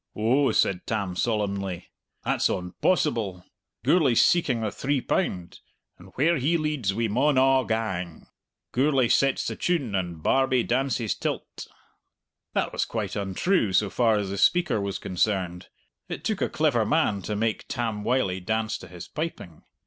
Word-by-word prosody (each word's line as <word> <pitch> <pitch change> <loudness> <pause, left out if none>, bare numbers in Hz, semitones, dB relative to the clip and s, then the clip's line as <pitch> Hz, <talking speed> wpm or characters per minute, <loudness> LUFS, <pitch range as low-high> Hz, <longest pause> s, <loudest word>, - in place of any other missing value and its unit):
"Oh," 125 +6 +2
said 90 -2 +1
Tam 100 -5 -2
solemnly, 100 -4 -2 0.3
"that's - - +1
on 90 0 -3
possible! 110 - +1 0.4
Gourlay's 140 -5 +4
seeking 135 -9 +2
the 110 -2 -1
three 140 +5 -1
pound! 90 - -2 0.4
and 90 +1 -14
where 165 +5 +3
he 150 +6 +1
leads 150 -10 -1
we 115 +3 -1
maun 130 +6 +2
a' 130 0 +4
gang. 95 -7 -3 0.5
Gourlay 130 -2 +2
sets 135 +3 +2
the - - -3
tune, 150 - -1
and 85 -4 -3
Barbie 130 -2 +2
dances 125 -3 0
till't." - - -5 0.9
That - - -1
was - - 0
quite - - -4
untrue 100 - 0
so 100 +1 +2
far 115 -3 +3
as 100 -2 -2
the 100 - -3
speaker 175 - +3
was 100 -1 -3
concerned. 90 -1 -1 0.4
It - - -5
took - - -2
a - - +1
clever - - +2
man 100 -1 +1
to 105 +3 -3
make 110 +1 -1
Tam 115 -4 -3
Wylie 110 -6 0
dance 110 +3 -2
to - - -11
his 90 0 -10
piping. 150 - -6
110 Hz, 155 wpm, -26 LUFS, 95-135 Hz, 0.9 s, Gourlay's